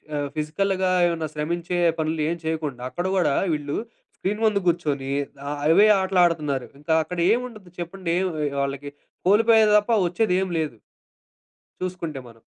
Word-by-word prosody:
ఆహ్, 145 -1 -1
ఫిజికల్‌గా 185 +5 0 0.2
ఏమన్నా 165 -2 -2
శ్రమించే 170 +3 -2 0.2
పనులు 160 0 -1
ఏం 170 - -2
చేయకుండా, 155 -6 -3
అక్కడ 175 - -3
గూడా 150 -6 +2 0.2
వీళ్ళు 145 -1 -3 0.4
స్క్రీన్ 210 +3 -2
ముందు 210 -2 +2
కూర్చొని 145 -6 -1 0.4
ఆహ్, 145 0 -3
అవే 190 +7 +6
ఆటలాడుతున్నారు. 170 -8 +1
ఇంకా 160 +2 0
అక్కడ 180 +2 -6
ఏముండదు 230 -7 -5
చెప్పండి. 175 0 -3
ఏం 190 - 0 0.4
వాళ్ళకి 140 +1 -4 0.4
కోల్పోయది 220 +1 +5
తప్ప, 210 +3 -4 0.2
వచ్చేదేం 185 +1 +1
లేదు 150 -7 -3 1.0
చూసుకుంటే 175 -6 -4
మనం. 115 -1 -17
170 Hz, 135 wpm, -24 LUFS, 150-190 Hz, 1.0 s, అవే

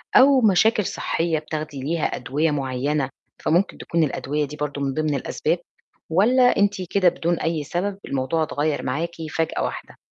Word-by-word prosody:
أو 265 0 +7
مشاكل 210 0 +4
صحّية 165 -2 -1
بتاخدي 155 -2 -5
ليها 160 +2 -1
أدوية 150 +5 0
معيّنة، 135 0 -1 0.3
فممكن 175 +5 +1
تكون 165 -1 0
الأدوية 150 +1 -1
دي 150 +2 -8
برضه 145 -1 -4
من 135 -1 -1
ضمن 155 0 0
الأسباب؟ 160 +5 -1 0.5
والَّا 245 +9 +4
أنتِ 200 -1 +2
كده 185 -3 +4
بدون 170 0 -1
أي 160 -2 -1
سبب 190 +6 -2
الموضوع 140 +4 0
اتغيّر 150 -1 -1
معاكِ 160 +7 -2 0.2
فجأة 165 0 0
واحدة؟ - - -5
160 Hz, 155 wpm, -23 LUFS, 145-180 Hz, 0.5 s, أو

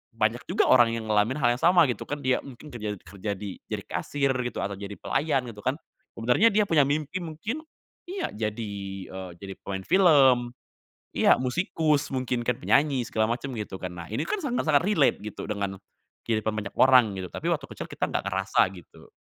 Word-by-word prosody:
banyak - - 0
juga - - +2
orang 120 -2 +6
yang 110 -1 -5
ngalamin 105 +4 +2
hal 120 -3 +3
yang 125 - -10
sama 175 -3 +6
gitu 125 - -3
kan, 145 - -3
dia 130 -2 0
mungkin 135 +2 -11
kerja 105 -7 -5
kerja 100 +1 -6
di, 100 0 -6 0.2
jadi - - -3
kasir 140 -2 -1
gitu, 120 - -4
atau 100 0 -2
jadi 100 +1 -7
pelayan 135 -4 0
gitu 105 -3 -10
kan. 135 +5 -1 0.4
Sebenarnya 125 - +4
dia 210 +1 +3
punya 155 -3 +5
mimpi 150 +5 -1
mungkin 215 - -5 0.4
iya, 375 0 -3
jadi, 110 0 -3 0.4
eee, 95 -1 -7
jadi 95 -1 -7
pemain 95 -1 -4
film 135 -10 +5 0.6
iya, - - +5
musikus 150 +2 0
mungkin 125 -2 -1
kan, 125 +1 -1
penyanyi 135 -4 +2
segala 110 +1 0
macem 130 +3 -3
gitu 105 -3 -5
kan, 90 - -5
nah 85 -1 -8
ini 115 +8 -1
kan 425 - -1
sangat-sangat 165 - +2
relate 185 -8 +3
gitu 105 - -6
dengan, 100 -2 -3 0.5
kehidupan 110 -1 0
banyak 105 -2 -5
orang 125 -6 +6
gitu, 90 - -4
tapi - - -5
waktu - - -1
kecil - - -7
kita - - -1
nggak - - -1
ngerasa 95 0 +1
gitu. 90 -4 -15
125 Hz, 190 wpm, -26 LUFS, 105-145 Hz, 0.6 s, orang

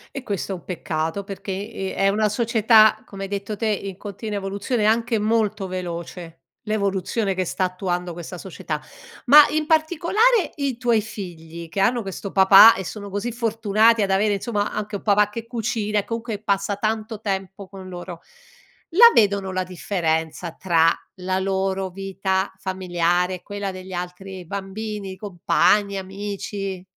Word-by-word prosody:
E 275 - -5
questo 200 -3 -3
è - - -3
un 175 - -12
peccato 165 +1 -3
perché, 195 0 -7 0.2
ehm, 195 -4 -4
è 195 0 +3
una 210 +1 +1
società, 220 -1 +4
come 195 -1 -8
hai 195 - -5
detto 200 +1 -4
te, 220 +2 -2
in 200 -2 -2
continua 205 +2 -6
evoluzione, 200 +4 -2
anche 230 +1 +2
molto 215 -2 0
veloce, 170 -2 -6 0.2
l'evoluzione 200 -1 -1
che 185 0 -1
sta 185 +2 -1
attuando 180 -1 -3
questa 175 +1 -8
società. 160 -5 -5 0.4
Ma 290 +3 +9
in 305 0 -1
particolare 350 +9 +2
i 275 -5 -2
tuoi 235 -3 +2
figli, 170 -6 -8
che 195 - -4
hanno 235 +5 +2
questo 195 -1 -6
papà 195 +3 +9
e 190 - -5
sono 200 +1 -7
così 205 +4 -2
fortunati 225 -1 +2
ad 200 - +1
avere 205 +2 +2
insomma 205 0 -2
anche 210 0 -4
un 200 - -6
papà 210 -1 +3
che 230 +2 -6
cucina 220 -3 -1
e - - -4
comunque 230 -2 -4
passa 200 -1 0
tanto 220 +1 -2
tempo 195 -1 -4
con 190 -1 -11
loro, 175 -1 -8 0.7
la 470 +6 +9
vedono 200 -3 +2
la 185 0 -1
differenza 170 -2 -2
tra 165 -3 +3 0.3
la 185 0 -2
loro 190 0 -1
vita 190 0 -2
familiare 180 -1 0
e 180 - -12
quella 205 -1 -4
degli 185 0 -10
altri 180 +1 -6
bambini, 200 +1 -5
compagni, 200 +1 +1
amici? 195 0 -5
200 Hz, 160 wpm, -22 LUFS, 185-215 Hz, 0.7 s, Ma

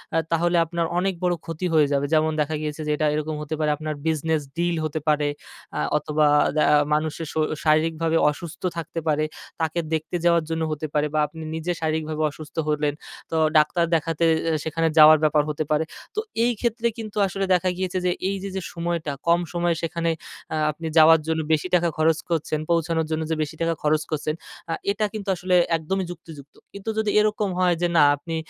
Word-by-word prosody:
আ - - +4
তাহলে 170 +1 +2
আপনার 170 0 -2
অনেক 190 +1 0
বড় 180 - +2
ক্ষতি 165 +2 -4
হয়ে 150 -2 +5
যাবে। 140 0 +1
যেমন 155 0 +3
দেখা 155 +1 -1
গিয়েছে 150 0 -4
যে, - - +1
এটা 155 +1 0
এরকম 155 0 -2
হতে 150 +1 -4
পারে 155 -1 +1
আপনার 155 0 -4
business 160 -1 0 0.2
deal 175 0 +1
হতে 155 0 -3
পারে 150 -1 +2 0.5
আ - - -1 0.2
অথবা 150 0 +1 0.3
দা 155 - +4 0.3
মানুষের 155 +1 -1
শ - - -18 0.3
শারীরিকভাবে 160 +1 +2
অসুস্থ 165 +2 -7 0.2
থাকতে 165 0 -4
পারে। 155 0 +2 0.4
তাকে 160 +1 0
দেখতে 160 +2 -2
যাওয়ার 170 -1 +4
জন্য 160 0 -2
হতে 155 +1 -3
পারে 150 0 +2
বা 155 - +1
আপনি 160 - -11
নিজে 160 +2 -2
শারীরিকভাবে 155 0 -1
অসুস্থ 150 +1 -12
হলেন। 150 -1 +1 0.4
তো - - -1 0.2
ডাক্তার 155 +3 +3
দেখাতে 165 +1 -1 0.3
এ - - +2
সেখানে 165 +1 0
যাওয়ার 155 0 +9
ব্যাপার 150 -1 +3
হতে 150 +1 -1
পারে। 150 +1 +3 0.3
তো - - 0 0.3
এইক্ষেত্রে 235 0 0
কিন্তু 215 -2 -7
আসলে 195 +1 -2
দেখা 185 +1 +2
গিয়েছে 185 0 -2
যে, 180 - +3 0.2
এইযে 195 0 -4
যে, 190 - -2
সময়টা 170 -3 -2 0.2
কম 170 +1 +5
সময়ে 175 -1 +1
সেখানে 165 0 -1 0.4
আ - - 0 0.2
আপনি 160 +2 -7
যাওয়ার 160 +1 +8
জন্য 160 0 0
বেশি 155 +3 0
টাকা 175 -1 +2
খরচ 155 0 +3
করছেন, 155 -2 -1
পৌঁছানোর 165 -1 +1
জন্য 160 0 0
যে, - - +2
বেশি 150 +1 -7
টাকা 165 0 +1
খরচ 155 0 +2
করছেন, 155 0 -1 0.4
আ - - +1 0.2
এটা 215 +1 0
কিন্তু 205 -2 -5
আসলে 180 +1 0 0.2
একদমই 190 +4 -2
যুক্তিযুক্ত। 160 -5 -12 0.2
কিন্ত্ব 200 +1 -11 0.3
এরকম 210 -1 +1
হয় 180 -1 +3
যে, 175 - +3
না, - - +7
আপনি 165 +3 -6
160 Hz, 190 wpm, -24 LUFS, 155-175 Hz, 0.5 s, যাওয়ার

